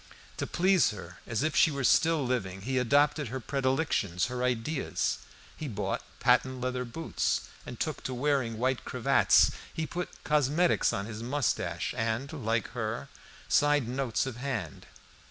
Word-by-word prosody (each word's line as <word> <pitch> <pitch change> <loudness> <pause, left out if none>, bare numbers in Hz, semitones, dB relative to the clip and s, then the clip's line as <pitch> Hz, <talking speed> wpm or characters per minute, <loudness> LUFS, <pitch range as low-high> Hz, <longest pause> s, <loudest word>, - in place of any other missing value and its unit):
To - - -2
please 185 0 +3
her, 90 -3 -9
as 115 +3 -1
if 155 0 0
she - - +6
were 140 -2 -3
still 160 +2 +4
living, 95 -7 -2
he 130 +5 0
adopted 145 +4 +3
her 130 +4 -4
predilections, 130 - 0
her 125 - -3
ideas; 125 +4 -1 0.4
he 155 - -5
bought 100 -5 -2 0.2
patent 130 -1 +3
leather 125 0 -2
boots 160 +8 -1 0.3
and - - -7
took - - -2
to 130 - -2
wearing 130 -4 0
white 130 +1 0
cravats. - - +4 0.2
He 160 - -3
put 175 +2 -4
cosmetics 150 +4 +2
on 100 - -2
his 110 0 -7
moustache, 125 +2 -1
and, 115 +6 -2
like 115 -6 -1
her, 115 +2 -4 0.4
signed 145 -4 +3
notes 130 -5 0
of 130 -3 -5
hand. 120 - -4
130 Hz, 155 wpm, -29 LUFS, 115-145 Hz, 0.4 s, she